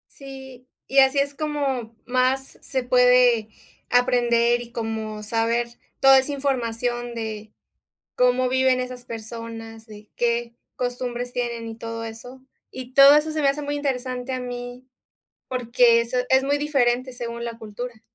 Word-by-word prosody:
Sí, 265 -2 -11 0.2
y 275 - +1
así 265 +1 +4
es 280 0 +1
como 275 -6 -2
más 255 +1 0
se 260 -2 -1
puede 250 -2 +4 0.4
aprender 240 -1 +3
y 235 0 -12
como 220 -2 -4
saber 230 +2 0 0.3
toda 270 0 +8
esa 265 +2 0
información 240 -3 -2
de 220 -2 -6 0.6
cómo 250 0 +2
viven 260 0 +2
esas 250 -1 -6
personas, 225 0 -8
de 210 -1 -14
qué 235 0 -1 0.2
costumbres 245 0 -3
tienen 235 -2 -3
y 225 - -7
todo 230 0 -6
eso. 245 +4 -9 0.3
Y 255 0 -9
todo 275 +1 +9
eso 305 +1 +2
se 310 -1 -2
me 275 - +4
hace 295 +2 -2
muy 290 0 -3
interesante 255 -2 -3
a 255 - -2
mí, 245 0 -7 0.6
porque 240 -1 +3
eso 235 +2 -2
es 265 0 +4
muy 285 +1 +1
diferente 255 -3 +1
según 235 -1 -5
la 230 -1 -6
cultura. 220 +1 -8
245 Hz, 150 wpm, -23 LUFS, 235-260 Hz, 0.6 s, todo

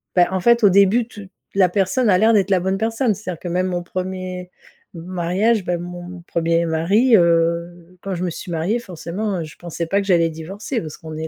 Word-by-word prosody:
bah, 175 -1 +5
en 190 - 0
fait, 235 +1 +4
au 200 - +8
début 200 +5 +4
tu 205 -5 -11 0.3
la 185 -3 +4
personne 200 +6 +1
a 185 - +5
l'air 225 +1 +4
d'être 200 -1 +2
la 185 - +4
bonne 190 +1 0
personne. 225 0 0
C'est-à-dire 180 -5 -6
que 180 - -7
même 180 +2 0
mon 175 -1 -2
premier 185 0 -5 0.4
m 165 - -7
mariage, 185 +4 0
bah, 175 -1 0
mon 175 0 -8
premier 165 0 +1
mari, 200 +10 +3
heu, 170 +1 0
quand 195 -1 -4
je 175 - -3
me - - -1
suis 175 - -7
mariée 170 +8 0
forcément, 185 0 -4
heu, - - -3
je 155 - -12
pensais 170 -1 -5
pas 200 +3 +1
que 195 - -7
j'allais 170 -3 +3
divorcer. 195 - -5
Parce 155 -2 -8
qu'on 160 -1 -8
est 160 0 -4
185 Hz, 225 wpm, -20 LUFS, 170-200 Hz, 0.4 s, au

